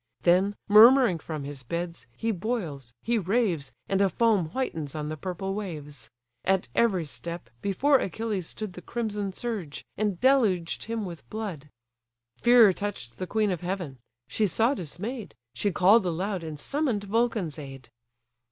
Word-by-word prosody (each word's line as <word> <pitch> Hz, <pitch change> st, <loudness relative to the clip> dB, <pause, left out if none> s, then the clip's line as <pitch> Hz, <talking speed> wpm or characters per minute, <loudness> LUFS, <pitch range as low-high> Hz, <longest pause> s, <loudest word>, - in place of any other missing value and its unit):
Then, 185 Hz, +4 st, +4 dB
murmuring 225 Hz, -2 st, +7 dB
from 155 Hz, -2 st, -5 dB
his 140 Hz, -1 st, -6 dB
beds, 170 Hz, 0 st, -4 dB
he 225 Hz, -, 0 dB
boils, 170 Hz, -, -3 dB
he 235 Hz, 0 st, +1 dB
raves, 185 Hz, -, 0 dB, 0.2 s
And 195 Hz, 0 st, +1 dB
a 195 Hz, -, +4 dB
foam 215 Hz, -6 st, +2 dB
whitens 160 Hz, -, -3 dB
on 150 Hz, -1 st, -3 dB
the 155 Hz, -, -3 dB
purple 185 Hz, +4 st, -4 dB
waves: 150 Hz, -, -6 dB, 0.3 s
At 190 Hz, -8 st, +1 dB
every 190 Hz, -8 st, +2 dB
step, 170 Hz, +4 st, -7 dB
before 260 Hz, +8 st, +3 dB
Achilles 200 Hz, -2 st, -3 dB
stood 215 Hz, -4 st, -6 dB
The 180 Hz, -, -9 dB
crimson 210 Hz, -4 st, -3 dB
surge, 195 Hz, -8 st, -5 dB
and 205 Hz, -4 st, 0 dB
deluged 220 Hz, -11 st, +2 dB
him 225 Hz, -2 st, -3 dB
with 170 Hz, -3 st, -9 dB
blood. 190 Hz, -10 st, -5 dB, 0.7 s
Fear 235 Hz, -, +7 dB
touch'd 175 Hz, -, -5 dB
the 185 Hz, -, -3 dB
queen 215 Hz, +1 st, +1 dB
of 180 Hz, -, -3 dB
heaven: 175 Hz, -7 st, -4 dB, 0.3 s
she 215 Hz, -, +1 dB
saw 225 Hz, -, +2 dB
dismay'd, 210 Hz, -, -6 dB, 0.2 s
She 195 Hz, -, 0 dB
call'd 190 Hz, +3 st, +5 dB
aloud, 185 Hz, +2 st, -2 dB
and 155 Hz, -2 st, -6 dB
summon'd 270 Hz, -, -1 dB
Vulcan's 210 Hz, -6 st, 0 dB
aid. 135 Hz, -3 st, -10 dB
190 Hz, 150 wpm, -27 LUFS, 165-220 Hz, 0.7 s, murmuring